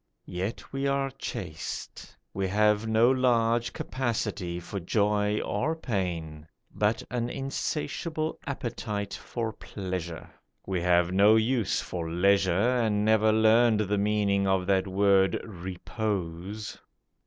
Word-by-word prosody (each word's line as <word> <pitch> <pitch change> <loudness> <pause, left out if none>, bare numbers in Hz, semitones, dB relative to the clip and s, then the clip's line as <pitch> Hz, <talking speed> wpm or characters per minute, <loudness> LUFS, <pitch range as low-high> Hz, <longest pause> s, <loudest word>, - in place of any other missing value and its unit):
Yet 95 +9 -5
we 135 0 -1
are 140 0 0
chaste; 90 -11 -6 0.2
We 95 -1 -1
have 105 +2 +2
no 110 +3 +4
large 120 -2 +2
capacity 105 -8 -3
for 95 +3 -6
joy 105 +2 +1
or 155 +5 -1
pain, 85 - -3 0.3
But 105 +1 +1
an 120 -1 -1
insatiable 155 +4 -3
appetite 110 -6 -4
for 115 -2 -4
pleasure. 90 -4 -6 0.3
We 95 -2 -1
have 90 0 +3
no 100 +3 +6
use 110 0 +1
for 85 -2 -4
leisure 95 +2 +3 0.3
And 105 -3 +1
never 110 0 +4
learned 110 0 +4
the 105 0 0
meaning 100 -1 +1
of 95 -1 +2
that 95 0 +2
word 95 0 +3
'repose. 95 0 -4
105 Hz, 120 wpm, -28 LUFS, 95-115 Hz, 0.3 s, no